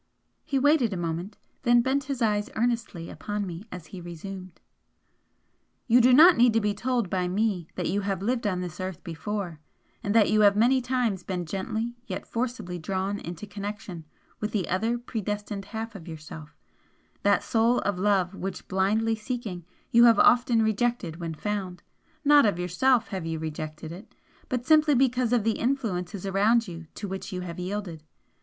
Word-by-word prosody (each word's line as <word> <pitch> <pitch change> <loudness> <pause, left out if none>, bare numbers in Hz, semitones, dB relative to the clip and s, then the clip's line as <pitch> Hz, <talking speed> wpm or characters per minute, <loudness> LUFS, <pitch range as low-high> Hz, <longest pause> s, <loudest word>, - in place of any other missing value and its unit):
He 275 - -1
waited 270 -5 +3
a - - -3
moment 175 +4 -4 0.2
then 240 0 +4
bent 265 +2 0
his 265 -3 -2
eyes 210 -1 +1
earnestly 230 -7 -1
upon 205 -1 -4
me 180 +3 -7
as 180 -3 -8
he 185 - -7
resumed 180 +1 -8 1.3
"You 245 +1 +5
do 250 +2 +6
not 330 +7 +8
need 240 -1 +5
to 225 - +4
be 210 -1 0
told 245 0 -1
by 180 0 -1
me 190 -3 0
that - - -2
you 200 +4 0
have 195 -1 -2
lived 235 0 0
on 185 -3 -1
this 175 -3 -6
earth 185 -2 -5
before, 175 0 -4 0.4
and 205 -2 -2
that 215 -3 +5
you 215 0 +4
have 200 -1 +6
many 250 +5 +4
times 245 -6 0
been 180 -1 -4
gently 220 +7 -3
yet 185 - -5
forcibly 230 -7 -3
drawn 195 +4 -2
into 170 +4 -7
connection 205 -4 -6 0.4
with 210 - -3
the 195 -6 0
other 225 +6 0
predestined 210 -4 -4
half 225 +2 -5
of 180 -5 -10
yourself, 80 - -10 0.6
that 200 0 +3
Soul 230 +2 +2
of 205 -3 -1
love 195 -2 +2
which 195 0 -6
blindly 210 +4 +1
seeking, 215 -6 -5 0.3
you 235 +1 +7
have 230 -3 +6
often 235 -1 +5
rejected 220 -6 0
when 165 -2 -5
found 190 -1 -4 0.4
not 290 -4 +7
of 200 - 0
yourself 215 +8 +2
have 185 -5 -4
you 165 0 -2
rejected 155 0 -6
it 180 +6 -11 0.3
but 250 -1 -2
simply 305 0 +5
because 250 -2 +2
of 240 -3 +3
the 225 0 0
influences 205 -8 -2
around 210 +4 +3
you 165 -2 -8
to 205 - -5
which 190 0 -6
you 180 -1 -4
have 175 -1 -6
yielded. 180 -3 -4
205 Hz, 175 wpm, -27 LUFS, 180-235 Hz, 1.3 s, not